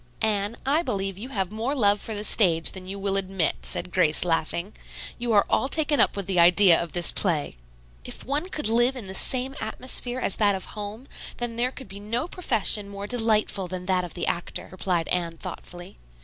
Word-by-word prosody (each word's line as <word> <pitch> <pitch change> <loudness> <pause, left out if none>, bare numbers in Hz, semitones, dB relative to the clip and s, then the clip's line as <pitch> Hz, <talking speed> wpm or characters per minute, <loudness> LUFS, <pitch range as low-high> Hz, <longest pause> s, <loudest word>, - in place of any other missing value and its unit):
"Anne, 210 0 0
I 290 +5 +2
believe 195 - -2
you 245 +5 -6
have 195 -7 -2
more 230 +6 -2
love 205 -5 +3
for 220 - -5
the 205 - -4
stage 170 -7 +4
than 185 -1 -9
you 195 +1 -5
will 195 0 0
admit," 190 -3 +2
said 180 - -2
Grace, 170 -2 +3
laughing. 170 +3 -1 0.5
"You 240 -1 -2
are 205 - +5
all - - +1
taken 295 0 +2
up - - +3
with 200 - -3
the 185 -2 0
idea 175 +1 +6
of 170 -2 -6
this 175 -1 +1
play." 160 - -1 0.5
"If - - -7
one 295 +7 -1
could 300 - -1
live 240 +4 +3
in 245 -5 -7
the 190 - -7
same 255 +6 +4
atmosphere 245 +2 -1
as 230 - 0
that 205 -2 +3
of 190 - -5
home, 215 +5 -7 0.3
then 240 -1 -4
there 245 +2 0
could 265 - -9
be 195 +1 -8
no 230 +8 -3
profession 220 - 0
more 200 0 -7
delightful 215 -4 0
than 180 0 -6
that 185 -1 +1
of 175 - -7
the 175 - -1
actor," 175 - -3
replied 180 -2 -1
Anne 170 -2 0
thoughtfully. 175 - -9
200 Hz, 205 wpm, -25 LUFS, 185-235 Hz, 0.5 s, idea